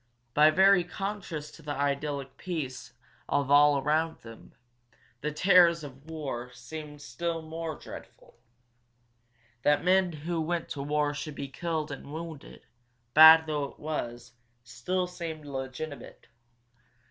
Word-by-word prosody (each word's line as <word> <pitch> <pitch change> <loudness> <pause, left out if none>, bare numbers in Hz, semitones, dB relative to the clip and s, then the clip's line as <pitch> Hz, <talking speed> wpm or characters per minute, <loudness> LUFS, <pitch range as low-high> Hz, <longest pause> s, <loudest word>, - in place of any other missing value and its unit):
By 150 +1 +6
very 190 +2 +5
contrast 175 -4 -5
to - - -14
the 145 -2 -4
idyllic 140 -1 -2
peace 150 -10 -5 0.4
of 140 -1 0
all 145 0 +6
about 155 +4 0
them, 115 -1 -13 0.7
the 150 - -2
terrors 170 0 +5
of 140 +2 -11
war 135 -6 -5
seemed 150 +3 -9 0.2
more 165 -1 -3
dreadful. - - -13 1.2
That 145 +3 +3
men 185 0 +3
who 165 +2 -3
went 170 +1 -2
to 145 - -5
war 145 +1 0
should 150 0 -6
be 140 -1 -5
killed 160 0 -3
and 140 0 -8
wounded, 160 -2 -8 0.5
bad 160 +1 +10
though 150 -2 -1
it - - -11
was, 120 -6 -5 0.3
still 125 +11 -2
seemed 170 -4 -7
legitimate. 135 0 -7
150 Hz, 125 wpm, -29 LUFS, 140-165 Hz, 1.2 s, bad